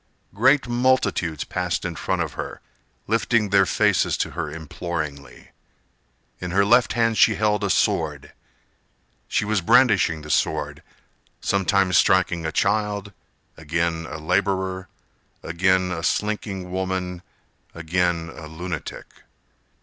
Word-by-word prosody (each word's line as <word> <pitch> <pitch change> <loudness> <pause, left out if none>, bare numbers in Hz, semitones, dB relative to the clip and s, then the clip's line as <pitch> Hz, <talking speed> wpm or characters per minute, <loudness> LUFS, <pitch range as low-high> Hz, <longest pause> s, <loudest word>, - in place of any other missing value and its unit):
Great 130 +6 +3
multitudes 120 - +1
passed 90 -1 -2
in 85 -2 -3
front - - -1
of - - -6
her, - - -6 0.5
Lifting 115 -1 +1
their 100 -1 +4
faces - - +2
to - - -2
her 75 - -4
imploringly. 75 -3 -6 0.9
In 90 - -5
her 100 +3 +3
left 120 +3 +4
hand 115 -2 +1
she - - +5
held 105 -1 +1
a 100 - 0
sword. - - 0 0.9
She - - 0
was 105 -2 0
brandishing 100 -8 +3
the 75 - -5
sword, - - 0 0.6
Sometimes 95 -2 +2
striking 85 -3 +2
a - - -2
child, 105 +2 0 0.4
again 80 +1 -2
a 80 - -6
laborer, 95 +2 -1 0.6
Again 95 +2 +1
a 85 -2 -3
slinking 100 0 -2
woman, 95 -1 -3 0.5
again 85 0 -1
a 80 - -9
lunatic. 85 0 -6
95 Hz, 120 wpm, -23 LUFS, 85-105 Hz, 0.9 s, she